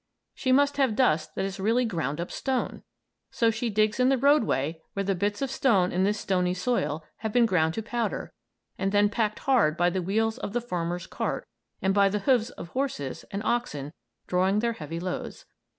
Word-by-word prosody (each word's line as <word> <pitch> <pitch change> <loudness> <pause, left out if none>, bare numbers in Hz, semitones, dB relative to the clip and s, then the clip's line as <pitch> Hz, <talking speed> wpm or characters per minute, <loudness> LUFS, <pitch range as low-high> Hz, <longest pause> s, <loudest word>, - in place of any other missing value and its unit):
She 260 - -1
must 285 +2 +4
have 265 -6 +2
dust 165 -11 +2
that - - -1
is 195 0 -5
really 230 +5 +2
ground 160 - -2
up 170 - -4
stone! 265 -2 -2 0.5
So 230 -1 +2
she 230 +2 -2
digs 215 +2 +1
in 250 +1 +4
the 270 - +3
roadway 215 - +2
where 200 - -1
the 195 0 +1
bits 205 +6 -1
of 270 - -2
stone 205 -9 +3
in 185 +2 +1
this 205 +1 0
stony 180 -2 0
soil 180 -7 -1
have 220 -1 -3
been 240 +1 +4
ground 165 -6 +2
to 225 - -3
powder 235 +2 -3 0.5
and 195 +1 0
then 205 0 +4
packed 215 0 0
hard 230 - +2
by 175 +1 +3
the 185 +1 -1
wheels 220 +6 0
of 205 - -5
the 240 - +1
farmer's 175 -6 -3
cart - - -3 0.4
and 190 0 +3
by 200 0 +4
the 205 - -1
hoofs 235 +2 +2
of 170 - -9
horses 255 - -3
and 200 +1 -4
oxen 155 - -2 0.3
drawing 185 +2 +2
their 235 +2 +1
heavy 165 -3 -6
loads. 185 - -5
205 Hz, 200 wpm, -27 LUFS, 180-240 Hz, 0.5 s, must